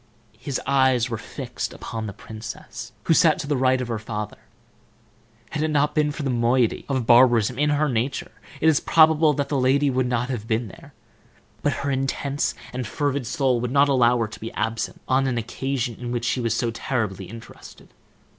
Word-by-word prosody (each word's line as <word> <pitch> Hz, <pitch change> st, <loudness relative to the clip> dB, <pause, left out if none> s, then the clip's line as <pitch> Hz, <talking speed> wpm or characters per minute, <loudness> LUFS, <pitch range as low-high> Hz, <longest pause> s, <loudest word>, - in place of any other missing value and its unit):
His 140 Hz, -, -3 dB
eyes 130 Hz, -3 st, +3 dB
were 115 Hz, -, -1 dB
fixed -, -, -5 dB
upon 110 Hz, -1 st, -6 dB
the -, -, -4 dB
princess, 110 Hz, +2 st, -9 dB
who -, -, +3 dB
sat 160 Hz, -1 st, +5 dB
to 160 Hz, -, -4 dB
the 145 Hz, 0 st, 0 dB
right 130 Hz, 0 st, +2 dB
of 125 Hz, -, -3 dB
her 115 Hz, -2 st, -3 dB
father. 105 Hz, -1 st, -5 dB, 1.1 s
Had 150 Hz, -, -2 dB
it 155 Hz, -, +1 dB
not 150 Hz, -1 st, +1 dB
been 150 Hz, -1 st, +2 dB
for 145 Hz, +1 st, -6 dB
the 135 Hz, -, 0 dB
moiety 120 Hz, 0 st, +1 dB
of 130 Hz, -4 st, 0 dB
barbarism 120 Hz, 0 st, +5 dB
in 150 Hz, 0 st, +3 dB
her 150 Hz, +1 st, +2 dB
nature 125 Hz, +1 st, -2 dB, 0.3 s
it 160 Hz, -, +2 dB
is 155 Hz, -2 st, +5 dB
probable 160 Hz, -1 st, +5 dB
that 140 Hz, +1 st, -2 dB
lady 140 Hz, +1 st, +2 dB
would 130 Hz, 0 st, +1 dB
not 125 Hz, 0 st, -1 dB
have 115 Hz, -4 st, -4 dB
been 115 Hz, -1 st, -1 dB
there, -, -, -15 dB, 0.7 s
but 145 Hz, -, +1 dB
her 140 Hz, -, 0 dB
intense 135 Hz, +1 st, -1 dB, 0.2 s
and 125 Hz, -2 st, -3 dB
fervid 140 Hz, 0 st, -1 dB
soul 130 Hz, -2 st, +1 dB
would 125 Hz, -, -2 dB
not 140 Hz, +1 st, +4 dB
allow 125 Hz, -2 st, +4 dB
her 115 Hz, -2 st, 0 dB
to 110 Hz, -, -11 dB
be 110 Hz, -, -6 dB
absent 115 Hz, 0 st, -2 dB
on 135 Hz, +1 st, +2 dB
an 125 Hz, -2 st, -1 dB
occasion 125 Hz, +1 st, -2 dB
in 120 Hz, -1 st, -5 dB
which 120 Hz, -1 st, -2 dB
she 125 Hz, +1 st, 0 dB
was 115 Hz, -2 st, 0 dB
so 115 Hz, 0 st, 0 dB
terribly 110 Hz, -6 st, -2 dB
interested. 115 Hz, +4 st, -13 dB
130 Hz, 195 wpm, -23 LUFS, 115-140 Hz, 1.1 s, sat